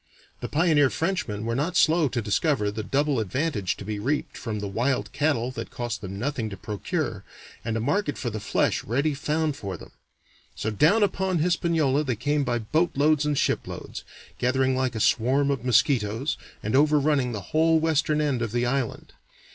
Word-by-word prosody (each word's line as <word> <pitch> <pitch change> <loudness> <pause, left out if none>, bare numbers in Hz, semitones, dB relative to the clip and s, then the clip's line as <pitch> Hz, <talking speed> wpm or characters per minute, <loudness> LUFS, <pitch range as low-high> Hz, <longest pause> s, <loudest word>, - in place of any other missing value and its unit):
The - - -5
pioneer 150 -3 +3
Frenchmen 130 - -2
were 115 - -1
not 150 +7 0
slow 160 -1 +4
to 120 -3 -2
discover 105 0 +1
the 110 +1 -4
double 140 +4 0
advantage 110 - -1
to - - -8
be 105 0 -3
reaped 145 +6 -2
from 110 -2 -4
the 100 - -4
wild 120 +7 -1
cattle 140 -5 0
that 130 - -6
cost 120 -1 -4
them 95 -1 -6
nothing 120 -1 -2
to 95 - -8
procure, 105 +1 -3 0.4
and 115 0 -2
a - - -1
market 145 - 0
for 120 - -3
the 110 - -4
flesh 100 - 0
ready 140 +7 0
found 150 +1 -1
for 95 -7 -5
them. - - -13 0.6
So 110 - -2
down 160 - +4
upon 190 -2 0
Hispaniola 160 -4 +1
they 130 -5 -1
came 145 +6 0
by 120 -2 0
boatloads 150 +4 +1
and 145 -1 0
shiploads, - - -2 0.4
gathering 130 +1 +2
like 130 -2 -1
a - - -2
swarm 135 +6 +2
of 135 -4 -2
mosquitoes, 125 0 +2 0.3
and 110 +4 -1
overrunning 145 -2 +3
the 100 -2 -8
whole 160 +1 +4
western 155 -1 +1
end 140 -5 0
of 115 -2 -3
the 120 0 +1
island. 130 -1 -2
135 Hz, 180 wpm, -25 LUFS, 115-150 Hz, 0.6 s, slow